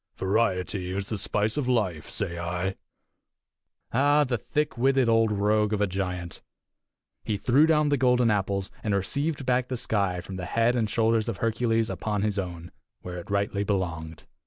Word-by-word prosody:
Variety 95 Hz, -2 st, 0 dB
is 95 Hz, +1 st, -3 dB
the 110 Hz, -, -2 dB
spice 105 Hz, +5 st, -1 dB
of 140 Hz, -4 st, -1 dB
life, 100 Hz, -11 st, 0 dB
say 85 Hz, 0 st, -3 dB
I." 90 Hz, +2 st, -2 dB, 1.2 s
Ah, 145 Hz, +4 st, +4 dB
the 125 Hz, -3 st, -1 dB
thick 150 Hz, +8 st, -1 dB
witted 130 Hz, +1 st, +3 dB
old 115 Hz, -1 st, +3 dB
rogue 105 Hz, +1 st, +2 dB
of 105 Hz, -, 0 dB
a 105 Hz, -, +3 dB
giant! 90 Hz, -2 st, -4 dB, 0.8 s
He 105 Hz, -, -1 dB
threw 130 Hz, +9 st, +4 dB
down 150 Hz, -2 st, +3 dB
the 145 Hz, -, +2 dB
golden 125 Hz, -2 st, +3 dB
apples, 100 Hz, -1 st, -1 dB
and 105 Hz, -2 st, +1 dB
received 140 Hz, -, -1 dB
back 125 Hz, 0 st, +1 dB
the 125 Hz, -, -3 dB
sky 100 Hz, -6 st, 0 dB
from 95 Hz, +2 st, -7 dB
the 90 Hz, -, -4 dB
head 115 Hz, +5 st, +2 dB
and 110 Hz, -3 st, 0 dB
shoulders 115 Hz, 0 st, +1 dB
of 110 Hz, -, -3 dB
Hercules 115 Hz, 0 st, +1 dB
upon 105 Hz, -3 st, -2 dB
his 105 Hz, -1 st, 0 dB
own, 85 Hz, -2 st, -6 dB, 0.3 s
where 90 Hz, -1 st, -5 dB
it 85 Hz, -, -11 dB
rightly 100 Hz, 0 st, 0 dB
belonged. 85 Hz, -6 st, -3 dB
105 Hz, 175 wpm, -26 LUFS, 95-120 Hz, 1.2 s, Ah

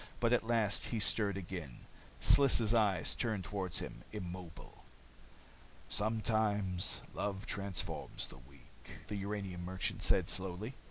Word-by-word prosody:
But 120 Hz, 0 st, +3 dB
at 115 Hz, -2 st, +2 dB
last 115 Hz, -3 st, +2 dB
he 115 Hz, -, -2 dB
stirred 105 Hz, -2 st, +2 dB
again. 85 Hz, -8 st, -6 dB, 0.4 s
Sliss' 120 Hz, -5 st, +7 dB
eyes 100 Hz, -7 st, +3 dB
turned 110 Hz, -6 st, -2 dB
toward 95 Hz, -3 st, -3 dB
him, -, -, -4 dB
immobile. 90 Hz, -4 st, -8 dB, 1.1 s
"Sometimes 105 Hz, -3 st, 0 dB
love 100 Hz, 0 st, -3 dB
transforms 100 Hz, -4 st, -3 dB
the -, -, -11 dB
weak," 70 Hz, +2 st, -16 dB, 0.2 s
the 105 Hz, -, -3 dB
uranium 100 Hz, -3 st, -4 dB
merchant 95 Hz, +1 st, -2 dB
said -, -, +3 dB
slowly. 95 Hz, +6 st, -2 dB
100 Hz, 120 wpm, -35 LUFS, 90-110 Hz, 1.1 s, Sliss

